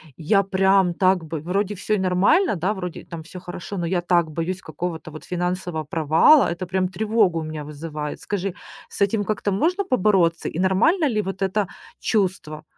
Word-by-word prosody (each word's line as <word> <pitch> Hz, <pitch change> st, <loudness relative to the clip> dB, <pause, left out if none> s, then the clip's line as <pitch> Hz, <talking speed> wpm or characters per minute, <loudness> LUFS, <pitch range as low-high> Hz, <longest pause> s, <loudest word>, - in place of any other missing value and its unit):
Я 195 Hz, -, +2 dB
прям 190 Hz, -1 st, +3 dB
так 185 Hz, -1 st, +2 dB
бы 160 Hz, 0 st, -4 dB
вроде, 195 Hz, +4 st, -1 dB
всё 210 Hz, +2 st, -1 dB
и -, -, 0 dB
нормально, 190 Hz, -, +3 dB
да? 185 Hz, +5 st, 0 dB
Вроде 180 Hz, -3 st, -6 dB
там 165 Hz, -2 st, -8 dB
всё 180 Hz, +2 st, -10 dB
хорошо, 180 Hz, +2 st, -7 dB
но 170 Hz, -1 st, -2 dB
я 175 Hz, 0 st, 0 dB
так 175 Hz, -2 st, +2 dB
боюсь 170 Hz, +4 st, -3 dB
какого-то 160 Hz, -1 st, -5 dB
вот 155 Hz, 0 st, -10 dB
финансового 180 Hz, -3 st, -3 dB
провала. 160 Hz, -, +5 dB
Это 175 Hz, +1 st, -5 dB
прям 185 Hz, 0 st, 0 dB
тревогу 210 Hz, -2 st, +1 dB
у -, -, -4 dB
меня 155 Hz, -1 st, -6 dB
вызывает. 150 Hz, 0 st, -6 dB
Скажи, 195 Hz, -2 st, -3 dB, 0.4 s
с -, -, -6 dB
этим 205 Hz, +1 st, +2 dB
как-то 205 Hz, 0 st, -1 dB
можно 350 Hz, -, +1 dB
побороться? 185 Hz, -, +2 dB
И 165 Hz, -, -5 dB
нормально 230 Hz, -, +3 dB
ли 215 Hz, -4 st, 0 dB
вот 195 Hz, 0 st, -5 dB
это 195 Hz, 0 st, 0 dB, 0.3 s
чувство? 180 Hz, -7 st, -1 dB
185 Hz, 185 wpm, -23 LUFS, 165-200 Hz, 0.4 s, провала